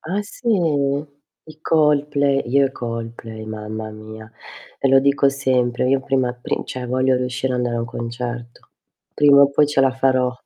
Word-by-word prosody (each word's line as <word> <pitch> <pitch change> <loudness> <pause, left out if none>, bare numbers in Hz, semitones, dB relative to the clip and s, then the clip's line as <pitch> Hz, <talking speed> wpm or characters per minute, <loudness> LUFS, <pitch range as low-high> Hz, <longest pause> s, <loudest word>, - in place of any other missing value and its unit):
Ah 195 +6 -3
sì, 235 +3 -7
i 145 -4 -2
Coldplay. 145 -3 +2
Io 140 +2 +3
i 135 - -7
Coldplay 115 -2 -7
mamma 110 0 -6
mia. 110 +1 -11 0.5
E 135 - +1
lo 135 0 +6
dico 140 0 +3
sempre, 125 -2 0
io 135 0 +2
prima 130 -2 0
pri 125 - -4
cioè 125 -1 -6
voglio 130 +1 +1
riuscire 125 +1 -2
a - - -1
andare 120 -1 -1
a - - -1
un - - -3
concerto. 120 +1 -7 0.5
Prima 145 -1 +6
o 140 - +4
poi 145 +1 +3
ce 145 -2 +1
la 135 0 +4
farò. 130 -1 +1
130 Hz, 170 wpm, -20 LUFS, 120-140 Hz, 0.5 s, lo